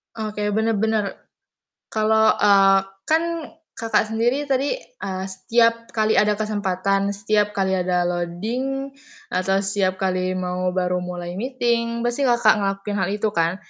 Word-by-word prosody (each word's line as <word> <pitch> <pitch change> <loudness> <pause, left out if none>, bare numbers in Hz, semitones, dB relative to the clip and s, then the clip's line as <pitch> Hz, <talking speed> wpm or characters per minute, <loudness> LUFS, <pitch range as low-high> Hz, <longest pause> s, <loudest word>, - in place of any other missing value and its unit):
Oke, 210 -1 -3
bener 220 -1 +1
bener. 220 0 +1 0.9
Kalo, 220 0 +3
eee, 195 -1 +5 0.3
kan, 320 +1 +3 0.5
Kakak 225 -1 +1
sendiri 240 +6 +1
tadi, 275 - 0 0.2
a 190 -1 -4
setiap 230 +4 +1
kali 215 0 +2
ada 210 -1 +3
kesempatan, 200 -2 0
setiap 205 +1 0
kali 190 -1 +1
ada 180 -1 +1
loading, 225 +11 -3 0.4
atau 195 +2 +1
setiap 195 -1 0
kali 185 -1 -1
mau 180 0 -2
baru 180 0 0
mulai 175 -1 -5
meeting, 235 -2 -1
pasti 240 +3 -1
Kakak 235 -5 +4
ngelakuin 195 +1 -2
hal 190 - 0
itu 215 +1 0
kan? 170 -1 +1
205 Hz, 135 wpm, -22 LUFS, 185-230 Hz, 0.9 s, eee